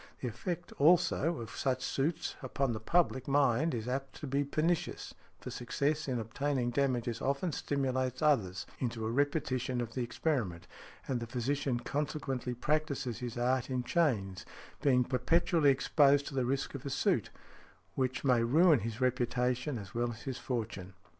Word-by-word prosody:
The 125 - -3
effect, 175 - -5
also, 165 +1 +4
of 115 - -7
such 130 -1 -1
suits 150 +6 -1
upon 130 -1 -1
the 110 - -4
public 130 0 +1
mind 140 +1 +3
is 110 0 -4
apt 135 +2 -3
to - - -7
be 140 +1 +1
pernicious, 155 +4 -1 0.3
for - - -7
success 145 +5 -1
in 130 -2 0
obtaining 120 +2 -1
damages 120 -3 0
often 140 +6 0
stimulates 130 -3 -1
others 100 -12 +2
into 115 -3 -2
a 110 - -1
repetition 130 -2 0
of 115 -2 -3
the 130 - -2
experiment, 115 - -1 0.4
and 130 -2 0
the 115 - -5
physician 125 +1 -1
consequently 135 -2 -2
practises 140 -3 -1
his 120 -1 -5
art 125 +1 +1
in 130 -1 -1
chains, 115 - 0 0.4
being 130 -3 +4
perpetually 150 +5 +2
exposed 140 +1 +4
to - - -10
the 130 -2 +1
risk 135 +1 -1
of 140 -2 -6
a 140 - -4
suit, 135 - +1 0.6
which 130 0 -1
may 125 -4 +4
ruin 155 +4 +5
his 115 +3 -5
reputation 125 +1 0
as 100 -3 -9
well 120 +1 0
as 110 - -10
his 135 -3 -4
fortune. 110 -7 -4
130 Hz, 160 wpm, -32 LUFS, 120-145 Hz, 0.6 s, ruin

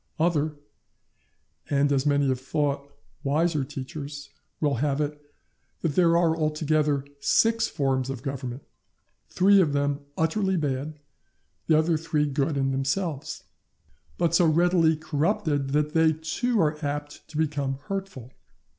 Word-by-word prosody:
Other, 155 -2 +1 1.1
and, 145 0 +2
as 140 +1 +1
many 145 -1 +3
have 130 -1 0
thought, 140 0 -2 0.3
wiser 155 +1 +1
teachers, 140 +1 -7 0.3
will 145 -4 +1
have 140 +2 0
it, 150 0 -2 0.6
that 165 -4 0
there 170 +1 +4
are 165 -2 +3
altogether 155 -2 0
six 225 +10 +3
forms 135 -2 -1
of 135 -2 -5
government, 130 -1 -5 0.7
three 195 +1 +5
of 150 -5 +1
them 145 0 0 0.2
utterly 190 +4 +1
bad, 145 0 -2 0.7
the 155 - +5
other 160 +1 +2
three 155 -2 0
good 140 +1 -1
in 135 0 +1
themselves, 140 +3 -2 0.7
but 170 - +1
so 170 0 +5
readily 165 0 +3
corrupted 150 -2 0
that 150 +2 0
they 160 -1 +4
too 210 +10 -1
are 150 -2 +1
apt 145 0 -4
to 155 - -8
become 140 -4 -1
hurtful. 190 -11 -6
150 Hz, 135 wpm, -26 LUFS, 140-160 Hz, 1.1 s, three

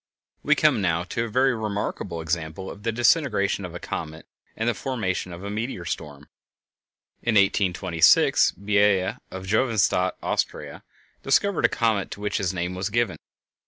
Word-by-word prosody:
We - - +3
come - - +3
now 85 -2 +1
to 115 +6 -3
a - - -6
very 130 +4 +3
remarkable 105 -6 -3
example 80 +3 -3
of 100 - -11
the 115 +2 -1
disintegration 115 - +2
of 85 -1 -8
a - - -5
comet 80 0 -6 0.3
and 110 - -1
the 120 - +2
formation 105 -10 -3
of 85 +2 -9
a 100 - -5
meteor 110 -4 -4
stream. 75 -3 -6 1.0
In 120 -2 0
1826 95 -4 +4
Biela, 100 +1 +1
of 95 0 -7
Josephstadt, 100 -4 +2
Austria, - - -2 0.4
discovered 195 +7 +2
a - - +4
comet 110 -5 0
to - - -8
which 105 0 -2
his 95 -2 0
name 90 0 -3
was 95 +2 -3
given. 115 -1 0
100 Hz, 160 wpm, -24 LUFS, 90-115 Hz, 1.0 s, 1826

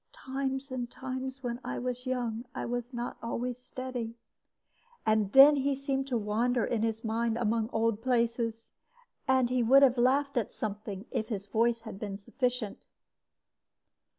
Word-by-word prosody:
'Times 270 0 -3
and 245 -2 -3
times, 260 +1 -5
when 240 -1 -3
I - - -3
was 250 +1 -3
young, 240 -2 -2
I - - -3
was 245 +1 -3
not 240 -1 -4
always 245 +1 -3
steady;' 250 -2 -5 0.9
and 215 -2 +2
then 280 +4 +9
he 275 0 +1
seemed 270 0 -2
to 250 -3 0
wander 230 +3 +1
in 230 -3 -1
his 225 0 -1
mind 230 0 0
among 225 -1 +1
old 225 -1 +1
places; 230 -2 0 0.6
and 260 -2 +3
he 250 -1 +2
would 265 +4 +7
have 255 -2 +5
laughed 275 +3 +2
at 225 - 0
something 205 -1 -5
if 220 - -2
his 200 -4 -3
voice 230 +3 +1
had 220 -4 -8
been 205 -2 -4
sufficient. 245 0 -3
240 Hz, 155 wpm, -30 LUFS, 225-260 Hz, 0.9 s, then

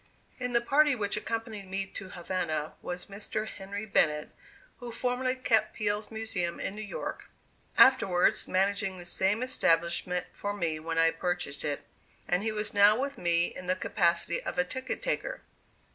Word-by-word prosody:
In 250 -1 -2
the 235 - +4
party 285 +3 +4
which 205 -3 -1
accompanied 220 -2 -4
me 195 +1 -2
to 190 0 -8
Havana, 170 -4 -2
was 180 0 -4
Mr. 210 +2 -4
Henry 200 +1 -6
Bennett, 150 -7 +2 0.5
who 245 -2 -6
formerly 250 +2 0
kept 235 -5 +2
Peale's 210 0 -1
Museum 220 -6 -2
in - - -3
New 215 - -6
York, 205 -2 -5 0.5
afterwards 185 -9 +5
managing 195 0 +1
the 175 - -9
same 195 +6 +1
establishment 175 -5 +1
for 205 0 -3
me 165 -5 -1
when 165 +1 -4
I 165 0 +5
purchased 175 -3 -2
it, 145 -1 -2 0.4
and 180 +1 +2
he 220 +1 0
was 210 -1 -2
now 205 +2 +6
with 280 +1 -3
me 170 0 +2
in 180 - -8
the 185 - +2
capacity 170 -2 +1
of - - -5
a 180 - +4
ticket 260 +8 -4
taker. - - -2
200 Hz, 165 wpm, -30 LUFS, 175-225 Hz, 0.5 s, now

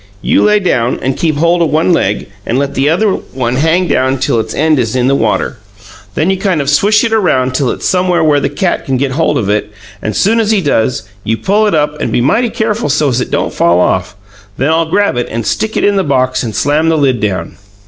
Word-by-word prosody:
You - - +2
lay 210 0 +3
down 125 - 0
and 135 0 -1
keep 160 -3 -1
hold 170 +3 +2
of 165 - +2
one 160 +4 +2
leg, 105 -10 -1 0.2
and 115 - -2
let 140 0 -1
the 135 +2 +1
other 205 +7 +2
one 125 -7 -3
hang 165 +5 +1
down 130 -2 +1
till 130 -3 0
its 110 - -4
end 155 -1 +2
is 115 -1 -1
in 125 -1 +1
the 135 - +2
water. 140 - -1 0.6
Then 165 +5 +1
you 190 - -1
kind 190 -5 0
of 140 0 0
swish 205 +8 +3
it 230 -1 0
around 130 -12 +1
till 130 -1 0
it's - - -3
somewheres 180 -3 +1
where 150 -2 +3
the 140 - -1
cat 175 +5 -1
can 135 -1 -1
get 135 +1 -1
hold 150 +1 0
of 110 -7 -2
it, 105 0 -1 0.3
and 105 - -3
soon 225 - +2
as 220 -2 0
he 220 -2 +3
does, 130 -7 0 0.2
you 115 +1 -1
pull 210 - +1
it 205 - +1
up, 150 0 -1
and - - -2
be - - +1
mighty 230 - +1
careful 220 -3 -2
so's 140 -4 +1
it - - -4
don't - - -2
fall 85 +1 +2
off. 90 0 0 0.4
Then 135 +4 0
I'll 165 0 +1
grab 200 -6 +1
it 120 - -1
and 115 -1 -4
stick 220 0 -2
it - - 0
in 205 -1 +2
the 195 - +2
box 130 -3 0
and 110 -5 -5
slam 150 +6 +1
the 160 - +2
lid 135 -5 +1
down." 95 -5 -3
145 Hz, 250 wpm, -12 LUFS, 125-180 Hz, 0.6 s, lay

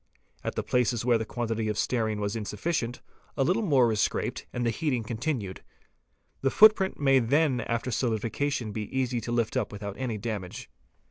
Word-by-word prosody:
At - - -3
the - - -1
places 120 -2 +1
where 120 -2 +4
the 110 - -2
quantity 115 -2 -2
of 105 - -2
stearine 110 -4 0
was 105 +1 -2
insufficient, 115 +3 -2 0.3
a 135 - +3
little 185 +11 +2
more 135 - +4
is 105 -1 +1
scraped - - -1
and 120 0 -2
the 115 - +2
heating 125 0 -1
continued. 110 -3 -3 0.8
The 135 - +2
footprint 210 +2 +5
may 135 -2 +5
then 135 +2 +2
after 115 +2 -2
solidification 115 +2 -1
be 105 0 -3
easily 125 -2 0
lifted 120 +2 +1
up 105 - -6
without 100 -1 -6
any 120 -4 -2
damage. 105 -4 -5
120 Hz, 175 wpm, -28 LUFS, 110-135 Hz, 0.8 s, footprint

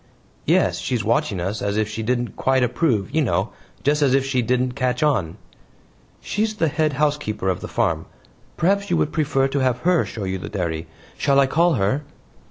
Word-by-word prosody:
"Yes. - - +3
She's - - -1
watching 95 - 0
us 95 +5 -3
as 100 +1 -1
if 110 -1 +1
she 110 +1 -5
didn't 120 +1 -1
quite 130 -1 +2
approve, 125 - 0
you 160 - +3
know 130 - 0 0.3
just 150 +2 +2
as 135 -2 +4
if 135 -1 +2
she 130 -2 +1
didn't 125 +2 +1
catch 125 +1 -1
on." 110 - +1 0.8
"She's 215 +1 -1
the 165 -6 +1
head 155 0 0
housekeeper 145 -9 0
of 90 - -1
the - - -5
farm. - - -1 0.5
Perhaps 200 +4 +1
you 175 - +2
would 150 - 0
prefer 140 -4 +1
to 140 - -1
have 130 -2 +1
her 180 0 +3
show 110 - -6
you 95 0 -2
the - - -6
dairy; 85 -4 -3 0.3
shall 140 -1 +3
I 140 - +5
call 165 +4 +2
her?" 115 +7 0
130 Hz, 195 wpm, -22 LUFS, 105-150 Hz, 0.8 s, I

